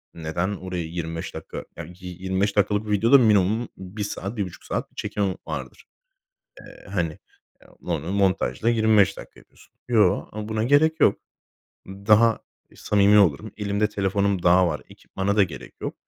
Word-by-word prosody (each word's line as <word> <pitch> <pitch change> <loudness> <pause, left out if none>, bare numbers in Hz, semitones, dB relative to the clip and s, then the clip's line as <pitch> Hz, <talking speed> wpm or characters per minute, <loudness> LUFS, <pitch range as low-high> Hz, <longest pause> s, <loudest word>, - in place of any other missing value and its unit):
Neden 85 +5 -2
oraya 90 -2 -5
25 80 0 -5
dakika, - - -8 0.2
ya 85 - -5
yi 90 +1 -11
yirmi 95 0 -1
beş 100 0 +1
dakikalık 105 +1 +1
videoda 115 +7 +5
minimum 110 0 +3
1 95 +3 -6
saat, 100 0 -4
bir - - -1
1,5 90 -3 -6
saat - - -4
bir - - -32
çekim 100 -3 -2
vardır. - - -7 0.8
Eee, - - -15
hani, 85 -5 -2 0.4
eee, - - -20 0.2
onu 85 +1 -2
montajla 95 - +1
25 110 -4 +3
dakika - - -12
yapıyorsun. - - -23
"Yoo, 115 -3 +2
ama 105 0 -6
buna 110 0 -1
gerek 155 +4 +3
yok. 100 - +4 0.7
Daha 105 +4 +3 0.3
e - - -21
samimi 105 0 +4
olurum. 100 +2 +2
Elimde 105 0 0
telefonum 100 -2 0
daha 90 0 +5
var. 75 - -3
Ekipmana 100 +2 -3
da 100 - +6
gerek 90 - -5
yok. - - -4
100 Hz, 165 wpm, -24 LUFS, 90-105 Hz, 0.8 s, da